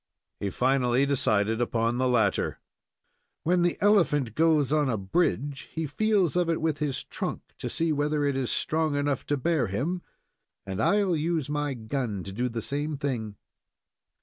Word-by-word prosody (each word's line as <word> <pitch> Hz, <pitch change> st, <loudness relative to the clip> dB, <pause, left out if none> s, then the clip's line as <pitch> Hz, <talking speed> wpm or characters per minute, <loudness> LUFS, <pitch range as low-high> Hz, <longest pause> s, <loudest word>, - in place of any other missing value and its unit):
He 100 Hz, -, -2 dB
finally 130 Hz, +3 st, +2 dB
decided 110 Hz, -5 st, +1 dB
upon 115 Hz, 0 st, 0 dB
the 130 Hz, -, +2 dB
latter. 110 Hz, -6 st, +1 dB, 0.8 s
"When 175 Hz, +2 st, +2 dB
the 175 Hz, 0 st, +1 dB
elephant 165 Hz, -, +3 dB
goes 155 Hz, -2 st, +3 dB
on 150 Hz, -3 st, +2 dB
a 115 Hz, -, 0 dB
bridge, 140 Hz, -, -1 dB
he 160 Hz, -1 st, -2 dB
feels 195 Hz, +2 st, +1 dB
of 175 Hz, -1 st, +2 dB
it 165 Hz, -, +1 dB
with 155 Hz, -2 st, -1 dB
his 145 Hz, -3 st, -1 dB
trunk -, -, -5 dB
to -, -, -3 dB
see 165 Hz, -1 st, +1 dB
whether 145 Hz, 0 st, 0 dB
it 140 Hz, -1 st, +1 dB
is 130 Hz, -2 st, -1 dB
strong 155 Hz, -2 st, 0 dB
enough 145 Hz, -2 st, -1 dB
to 145 Hz, -, +1 dB
bear 145 Hz, -3 st, +1 dB
him, 150 Hz, -, -2 dB, 0.6 s
and 95 Hz, -1 st, -3 dB
I'll 200 Hz, -4 st, +3 dB
use 155 Hz, -2 st, -1 dB
my 145 Hz, -2 st, -1 dB
gun 110 Hz, -4 st, -3 dB
to 95 Hz, -, -7 dB
do 125 Hz, +6 st, -1 dB
the 115 Hz, -2 st, -4 dB
same 145 Hz, +1 st, -2 dB
thing." 120 Hz, -7 st, -3 dB
145 Hz, 170 wpm, -27 LUFS, 120-160 Hz, 0.8 s, elephant